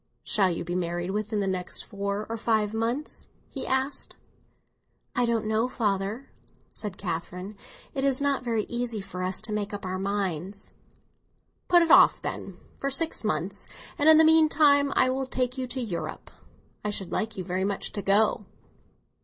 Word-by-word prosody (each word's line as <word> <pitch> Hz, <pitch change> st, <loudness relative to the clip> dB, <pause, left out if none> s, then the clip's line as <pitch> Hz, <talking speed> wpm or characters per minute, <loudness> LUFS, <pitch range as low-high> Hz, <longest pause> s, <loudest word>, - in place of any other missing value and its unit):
"Shall 195 Hz, -3 st, +3 dB
you 170 Hz, -1 st, -3 dB
be 175 Hz, -, -3 dB
married 175 Hz, 0 st, -2 dB
within 210 Hz, +1 st, -1 dB
the 195 Hz, -, -1 dB
next 185 Hz, -2 st, -2 dB
four 200 Hz, +1 st, -3 dB
or 230 Hz, -, -3 dB
five 220 Hz, -2 st, +1 dB
months?" 235 Hz, +7 st, -2 dB, 0.2 s
he 270 Hz, -, -4 dB
asked. 265 Hz, +2 st, -1 dB, 1.0 s
"I 245 Hz, -1 st, +2 dB
don't 230 Hz, -2 st, 0 dB
know, 220 Hz, +2 st, +1 dB
father," 215 Hz, +1 st, -2 dB, 0.4 s
said 205 Hz, -3 st, -6 dB
Catherine. 180 Hz, +2 st, -5 dB, 0.4 s
"It 270 Hz, -, -2 dB
is 275 Hz, -2 st, +2 dB
not 280 Hz, -2 st, +1 dB
very 230 Hz, -3 st, 0 dB
easy 240 Hz, -2 st, -2 dB
for 185 Hz, -2 st, -6 dB
us 185 Hz, +2 st, -2 dB
to 215 Hz, -1 st, -3 dB
make 210 Hz, -1 st, -2 dB
up 200 Hz, -, -7 dB
our 185 Hz, 0 st, -3 dB
minds." 195 Hz, -2 st, -3 dB, 1.0 s
"Put 350 Hz, -1 st, +6 dB
it 330 Hz, -, +1 dB
off, -, -, +7 dB
then, -, -, -5 dB, 0.2 s
for 275 Hz, -, -1 dB
six 315 Hz, +2 st, 0 dB
months, 195 Hz, +2 st, -2 dB, 0.3 s
and 295 Hz, +2 st, +4 dB
in 315 Hz, -, +9 dB
the 320 Hz, -, +7 dB
meantime 305 Hz, -3 st, +5 dB
I 255 Hz, -, +4 dB
will 265 Hz, 0 st, -2 dB
take 255 Hz, -1 st, -1 dB
you 255 Hz, -, -2 dB
to 255 Hz, +2 st, -4 dB
Europe. 170 Hz, -10 st, -4 dB, 0.5 s
I 210 Hz, -, -1 dB
should 195 Hz, -3 st, -3 dB
like 220 Hz, -1 st, -2 dB
you 185 Hz, -, -3 dB
very 185 Hz, +1 st, -2 dB
much 200 Hz, 0 st, -1 dB
to 205 Hz, -, -4 dB
go." 205 Hz, 0 st, +3 dB
215 Hz, 175 wpm, -27 LUFS, 195-255 Hz, 1.0 s, in